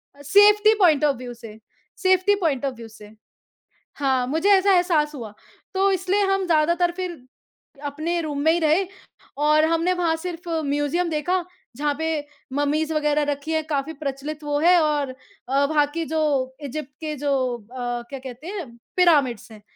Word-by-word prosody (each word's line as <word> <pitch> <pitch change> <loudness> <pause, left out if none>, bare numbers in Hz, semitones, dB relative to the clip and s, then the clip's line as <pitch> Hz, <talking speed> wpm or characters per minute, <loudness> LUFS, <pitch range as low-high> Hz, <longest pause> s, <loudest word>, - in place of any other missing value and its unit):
A, 285 - -15
safety 415 +7 +5
point 315 -6 +4
of 285 - +2
view 245 0 -8
से, 225 -2 -12 0.4
safety 375 0 +3
point 300 -9 -1
of 270 - -1
view 230 -1 -10
से। 210 -1 -14 0.8
हाँ, 265 -3 +1
मुझे 320 +9 +1
ऐसा 395 0 +5
एहसास 335 -5 +2
हुआ। 225 -6 -8 0.4
तो 390 +1 +2
इसलिए 380 +2 0
हम 390 0 +1
ज़्यादातर 340 +1 +2
फिर 355 -6 -5 0.6
अपने 315 +4 -2
रूम 295 -3 -4
में 320 +2 +4
ही 345 - +1
रहे 325 +4 +2 0.5
और 305 +1 +4
हमने 330 +3 +1
वहाँ 345 -3 0
सिर्फ़ 345 +1 -7 0.2
म्यूज़ियम 290 +5 0
देखा, 345 +4 0 0.3
जहाँ 295 0 0
पे 320 - -2 0.5
मम्मीज़ 300 +3 0
वगैरह 300 -1 +1
रखी 285 +3 -5
हैं, 315 0 0
काफ़ी 295 +1 -2
प्रचलित 290 +1 -5
वो 290 0 -1
है 350 +3 +5
और 295 -3 0 0.4
अ, 275 +1 +3
वहाँ 295 0 +2
की 335 -1 -2
जो 290 -5 0
इजिप्ट 285 0 -5
के 305 -1 -3
जो 285 +1 -2 0.3
अ, 245 +2 -5
क्या 275 - -6
कहते 260 +4 -10
हैं, 375 -6 -5 0.3
पिरामिड्स 285 - +3
हैं। 215 -1 -13
305 Hz, 170 wpm, -23 LUFS, 280-350 Hz, 0.8 s, safety